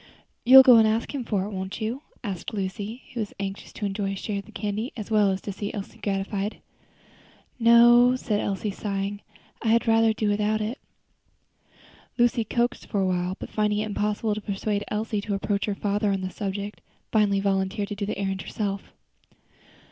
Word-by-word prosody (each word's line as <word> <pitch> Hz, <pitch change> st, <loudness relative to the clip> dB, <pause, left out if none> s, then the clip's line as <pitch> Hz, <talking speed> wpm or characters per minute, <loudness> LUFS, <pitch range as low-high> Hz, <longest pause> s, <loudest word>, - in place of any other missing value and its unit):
"You'll 265 Hz, +2 st, +10 dB
go 250 Hz, -3 st, +8 dB
and 220 Hz, -1 st, +6 dB
ask 225 Hz, +5 st, -1 dB
him 275 Hz, -3 st, -3 dB
for 205 Hz, -4 st, -1 dB
it, 210 Hz, -, -6 dB
won't 190 Hz, 0 st, -5 dB
you?" 230 Hz, +5 st, -3 dB, 0.2 s
asked 200 Hz, +1 st, -5 dB
Lucy, 205 Hz, +4 st, -4 dB
who 240 Hz, -, -4 dB
was 210 Hz, -2 st, -4 dB
anxious 195 Hz, 0 st, -5 dB
to 210 Hz, -, -4 dB
enjoy 195 Hz, 0 st, -2 dB
a -, -, -4 dB
share 200 Hz, +1 st, -3 dB
of 200 Hz, -, -9 dB
the -, -, -13 dB
candy 215 Hz, +3 st, -3 dB
as 215 Hz, 0 st, -6 dB
well 210 Hz, -2 st, +4 dB
as 190 Hz, 0 st, -1 dB
to 205 Hz, -, -5 dB
see 205 Hz, +1 st, -4 dB
Elsie 200 Hz, -2 st, -7 dB
gratified. 200 Hz, +1 st, -2 dB, 1.0 s
"No," 240 Hz, +2 st, +7 dB
said 215 Hz, -5 st, -1 dB
Elsie, 200 Hz, +1 st, -2 dB
sighing, 200 Hz, 0 st, -3 dB, 0.4 s
"I -, -, -3 dB
had 230 Hz, +1 st, +3 dB
rather 225 Hz, 0 st, +4 dB
do 215 Hz, 0 st, -1 dB
without 210 Hz, +1 st, +1 dB
it." 220 Hz, +5 st, -3 dB, 1.4 s
Lucy 240 Hz, -1 st, +3 dB
coaxed 240 Hz, +2 st, -1 dB
for 205 Hz, -, -1 dB
a -, -, +2 dB
little 180 Hz, -1 st, +1 dB
while, 180 Hz, +1 st, -3 dB
but -, -, -8 dB
finding 210 Hz, -1 st, +1 dB
it 210 Hz, -, 0 dB
impossible 210 Hz, +1 st, -1 dB
to 215 Hz, -, -4 dB
persuade 205 Hz, +1 st, -2 dB
Elsie 210 Hz, 0 st, -2 dB
to 205 Hz, -1 st, -2 dB
approach 200 Hz, +1 st, -1 dB
her 205 Hz, -, -2 dB
father 205 Hz, +1 st, 0 dB
on 195 Hz, -1 st, -1 dB
the 185 Hz, 0 st, -4 dB
subject, 200 Hz, +1 st, -5 dB, 0.3 s
finally 205 Hz, -3 st, +3 dB
volunteered 195 Hz, +1 st, 0 dB
to 205 Hz, -, -4 dB
do 200 Hz, 0 st, -3 dB
the 210 Hz, -, -3 dB
errand 195 Hz, -1 st, -2 dB
herself. 200 Hz, -2 st, -4 dB
210 Hz, 195 wpm, -25 LUFS, 195-220 Hz, 1.4 s, You'll